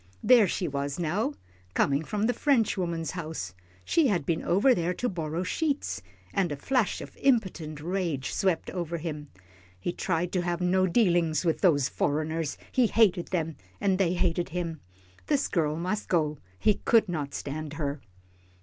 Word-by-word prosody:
There 235 -5 +7
she 180 - -1
was 140 0 -3
now, 170 -1 -1 0.4
coming 140 +2 +2
from 210 +5 -1
the 245 - +2
French 245 -4 +2
woman's 170 -4 -2
house. 155 - -5 0.3
She 325 -4 +3
had 175 - +1
been 165 +1 0
over 205 +9 +4
there 175 -3 -1
to 245 - -1
borrow 165 -3 -2
sheets, 285 - -1 0.3
and 180 -5 +1
a - - -1
flash 245 - 0
of - - -10
impotent 190 - +1
rage 165 -5 -2
swept 185 -4 0
over 170 -2 -3
him. 150 -3 -5 0.5
He 175 - -2
tried 175 -1 -1
to 180 - +1
have 175 -1 -1
no 185 +1 +3
dealings 175 -5 +2
with 165 - +1
those 145 -8 +4
foreigners. 155 +1 -1
He 250 -3 +4
hated 200 -6 +3
them, 165 -3 -2 0.2
and 195 -2 +1
they 180 -3 +3
hated 175 -1 0
him. 170 -2 -3 0.5
This 290 -2 +2
girl 155 -4 0
must 185 +6 -2
go, 155 -4 +1 0.2
he 210 - +2
could 225 -2 +4
not 150 -5 -3
stand 150 +1 -5
her. 145 -3 -3
175 Hz, 165 wpm, -28 LUFS, 155-195 Hz, 0.5 s, There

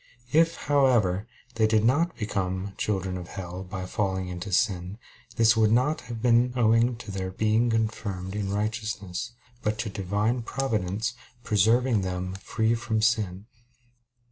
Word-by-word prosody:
If, 165 +1 +4
however, 120 -9 +2 0.3
they 110 -2 +3
did 110 0 +2
not 160 +8 +2
become 95 -2 -2
"children 95 -3 -2
of 90 - -8
hell" 90 0 -6
by 95 -1 -6
falling 95 -1 -2
into 90 +3 -6
sin, 90 -1 0 0.4
this 115 0 +5
would 110 -1 +3
not 130 +7 +2
have 115 -2 -6
been 120 0 +4
owing 115 0 +3
to 115 -3 -9
their 95 -1 -3
being 110 +5 +1
confirmed 110 -4 -2
in 100 -2 -2
righteousness, 105 0 -3 0.3
but 105 0 -1
to 110 - -3
Divine 105 +5 -1
Providence 115 -3 -1 0.3
preserving 110 +2 +3
them 90 0 -3
free 110 +4 0
from 115 -1 -1
sin. 105 -4 +1
110 Hz, 145 wpm, -27 LUFS, 95-115 Hz, 0.4 s, this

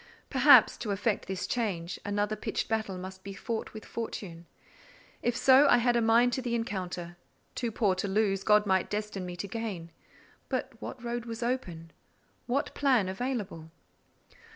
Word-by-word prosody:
Perhaps, 275 +2 +7
to 225 - -5
effect 205 +2 -1
this 190 0 -3
change, 185 -7 -2
another 205 +1 -1
pitched 215 - -3
battle 220 -4 -2
must 190 +1 -8
be 200 - -7
fought 225 +3 -4
with 215 -1 -10
fortune; 175 -7 -6 0.7
if 240 0 0
so, 270 +3 +6
I 245 - +6
had 240 0 +2
a 235 - +3
mind 230 +2 +4
to 260 - -1
the 240 -2 -1
encounter: 180 -6 -4 0.4
too 235 -2 -2
poor 210 -3 +2
to 185 +2 -2
lose, 195 -1 +1
God 210 0 +4
might 190 -2 +1
destine 210 -3 -3
me 180 - -6
to 180 +3 -5
gain. 195 -6 -5 0.6
But 260 0 -2
what 250 - -7
road 240 0 -3
was 230 0 -5
open?—what 240 - -5
plan 255 -9 +2
available? 195 -7 -4
215 Hz, 160 wpm, -29 LUFS, 190-240 Hz, 0.7 s, Perhaps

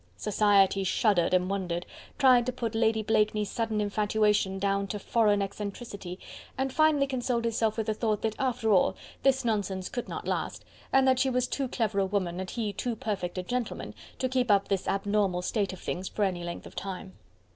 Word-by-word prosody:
Society 200 -2 +3
shuddered 185 -2 +2
and 180 0 +3
wondered! 180 -3 -2 0.3
tried 255 -3 +5
to - - +1
put 235 -3 -3
Lady 225 -1 +2
Blakeney's 210 -1 +1
sudden 225 -2 -1
infatuation 210 -1 +1
down 200 0 0
to 210 - -3
foreign 205 -1 +2
eccentricity, 200 -2 -6 0.4
and 265 0 -1
finally 310 -3 +4
consoled 245 -3 -1
itself 225 -1 0
with 220 - -1
the 215 - 0
thought 215 -1 -1
that 220 -1 0
after 245 -4 0
all 190 - +4 0.3
this 265 -2 +2
nonsense 200 -4 -1
could 245 - -5
not - - -5
last, - - -3 0.3
and 270 0 +4
that 260 -1 +4
she 265 0 +3
was 250 -1 +1
too 275 -2 -2
clever 220 -5 -1
a 195 - +3
woman 185 -3 -1
and 190 -1 -4
he 215 -2 -3
too 240 +4 -2
perfect 195 -5 -3
a 185 - -2
gentleman 245 +5 -3 0.2
to 260 - 0
keep 255 -2 0
up 200 -1 +3
this 195 -2 -1
abnormal 195 -2 +1
state 200 +1 0
of 185 - -9
things 185 +1 -4
for 210 - -1
any 180 -3 -1
length 170 0 -6
of - - -12
time. 190 -1 -6
210 Hz, 195 wpm, -28 LUFS, 195-235 Hz, 0.4 s, tried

